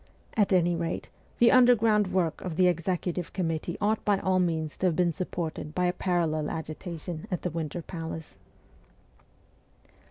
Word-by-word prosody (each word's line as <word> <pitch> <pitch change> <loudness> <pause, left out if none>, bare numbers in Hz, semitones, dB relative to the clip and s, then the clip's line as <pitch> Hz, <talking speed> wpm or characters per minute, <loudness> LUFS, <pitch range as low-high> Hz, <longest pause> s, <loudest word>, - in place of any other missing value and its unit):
At 205 -3 +3
any 175 -2 +3
rate, 165 0 -3 0.3
the 235 - +6
underground 230 -5 +5
work 175 -4 0
of 180 -3 -4
the 185 - +4
executive 175 0 -1
committee 165 -2 -2
ought 215 +1 +1
by 205 -2 +3
all 190 -1 +1
means 160 -4 0
to 185 - +1
have 170 - +1
been 175 -1 +2
supported 160 -2 -4
by 180 - +1
a 180 - +2
parallel 165 -5 0
agitation 160 +2 -6
at 180 -4 -3
the 180 - -1
Winter 165 +1 -4
Palace. 160 - -7
175 Hz, 155 wpm, -28 LUFS, 165-185 Hz, 0.3 s, the